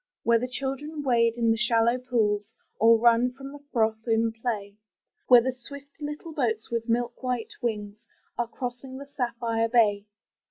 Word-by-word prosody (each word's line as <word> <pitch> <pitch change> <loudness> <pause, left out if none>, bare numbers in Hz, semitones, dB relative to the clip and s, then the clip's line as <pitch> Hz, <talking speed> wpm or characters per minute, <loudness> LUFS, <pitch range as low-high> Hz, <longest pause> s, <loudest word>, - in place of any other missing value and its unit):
Where 235 0 +4
the 250 - -2
children 275 +4 -4
wade 230 -3 +3
in 230 -1 +2
the 225 - +1
shallow 230 +2 +2
pools, 220 -4 -1 0.2
Or 230 +1 +6
run 235 +2 +4
from 270 +1 -9
the 290 0 -12
froth 220 -1 0
in 225 0 +2
play. 220 -3 -4 0.5
Where 245 -2 +8
the 260 - 0
swift 280 +4 -12
little 300 +2 -6
boats 225 -7 -1
with 230 0 -2
milk 240 +1 -1
white 250 -3 -2
wings 210 -3 -3 0.4
Are 240 - -1
crossing 250 +2 -6
the 280 - -8
sapphire 235 -4 -2
bay. 210 -3 +3
235 Hz, 165 wpm, -26 LUFS, 225-255 Hz, 0.5 s, Where